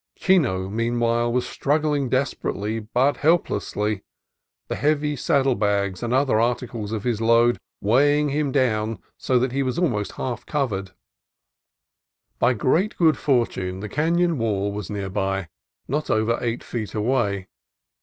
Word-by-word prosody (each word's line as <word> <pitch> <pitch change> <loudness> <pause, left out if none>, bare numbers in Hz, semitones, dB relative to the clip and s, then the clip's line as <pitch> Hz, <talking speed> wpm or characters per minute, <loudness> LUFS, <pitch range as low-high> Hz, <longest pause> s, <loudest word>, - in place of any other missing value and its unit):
Chino, 130 - +2
meanwhile, 120 +2 0
was 125 0 0
struggling 145 -2 0
desperately 115 -4 -1
but 125 +6 +1
helplessly, 105 - 0 0.7
the - - -3
heavy 150 0 +1
saddle 135 0 +2
bags 100 -3 0
and 120 - -2
other 130 -3 +3
articles 120 -2 -1
of 110 -2 -3
his 120 -3 -1
load 115 +1 +4 0.2
weighing 145 +7 +3
him 145 0 0
down 115 -5 +1 0.2
so 130 - +1
that 125 +1 +1
he 135 +2 0
was 130 -2 -1
already 120 - 0
half 125 -2 -3
covered. 105 -10 -1 1.5
By 125 - +3
great 165 - +1
good 160 -4 +4
fortune 115 -10 0
the 105 +1 -6
canon 165 - +1
wall 100 -3 0
was 105 0 -5
near 100 -2 -3
by, 95 -2 -2 0.4
not 150 +3 -2
over 110 +2 +1
eight 120 0 -2
feet 110 -3 -5
away. 105 -4 0
120 Hz, 140 wpm, -23 LUFS, 105-140 Hz, 1.5 s, load